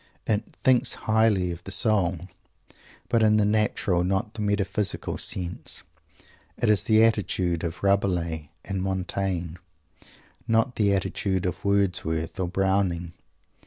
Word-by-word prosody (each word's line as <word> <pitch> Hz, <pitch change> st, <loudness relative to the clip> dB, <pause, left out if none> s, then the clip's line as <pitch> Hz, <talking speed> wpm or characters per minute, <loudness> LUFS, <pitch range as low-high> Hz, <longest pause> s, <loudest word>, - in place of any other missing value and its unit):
It 105 Hz, -1 st, -2 dB
"thinks 130 Hz, -1 st, +4 dB
highly 110 Hz, -5 st, +3 dB
of 85 Hz, +1 st, -8 dB
the 95 Hz, -, -8 dB
soul," 95 Hz, -5 st, +1 dB, 0.9 s
but 115 Hz, -, +2 dB
in 110 Hz, -1 st, +4 dB
the 105 Hz, -, +3 dB
natural, 105 Hz, -4 st, +1 dB
not 95 Hz, +4 st, -1 dB
the 110 Hz, -, -6 dB
metaphysical, 100 Hz, -1 st, -1 dB
sense. 90 Hz, -1 st, -3 dB, 0.7 s
It -, -, +2 dB
is 100 Hz, -4 st, +3 dB
the 110 Hz, 0 st, +5 dB
attitude 95 Hz, -6 st, +1 dB
of 85 Hz, +2 st, -5 dB
Rabelais 90 Hz, -6 st, 0 dB, 0.2 s
and 95 Hz, -1 st, -3 dB
Montaigne, 95 Hz, -2 st, -2 dB, 0.9 s
not 115 Hz, +2 st, +2 dB
the 100 Hz, -2 st, +3 dB
attitude 95 Hz, -1 st, -1 dB
of 90 Hz, +1 st, -3 dB
Wordsworth 90 Hz, -4 st, 0 dB
or 90 Hz, -, 0 dB
Browning. 95 Hz, -2 st, 0 dB
95 Hz, 125 wpm, -25 LUFS, 90-105 Hz, 0.9 s, the